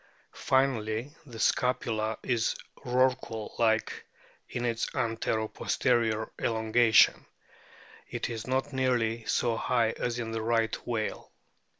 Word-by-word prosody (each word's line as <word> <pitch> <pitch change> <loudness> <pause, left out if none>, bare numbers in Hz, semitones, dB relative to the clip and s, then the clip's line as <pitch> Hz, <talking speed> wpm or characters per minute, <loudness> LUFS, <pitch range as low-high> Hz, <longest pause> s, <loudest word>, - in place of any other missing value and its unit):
Finally, 130 0 0
the 120 -3 -10
scapula 110 -3 0
is 120 -3 0 0.2
Rorqual 125 -4 0
like 110 -1 +1 0.5
in 120 0 -3
its 115 -1 -1
antero 115 -1 -1
posterior 110 -2 0
elongation; 110 0 +4 0.8
it - - -3
is 115 -1 -5
not 130 +2 -1
nearly 120 -3 0
so 115 -2 +1
high 115 -1 +1
as 120 +1 -3
in 115 -2 -4
the 115 0 -2
Right 115 0 +1
whale. 115 -3 -3
115 Hz, 110 wpm, -29 LUFS, 110-125 Hz, 0.8 s, elongation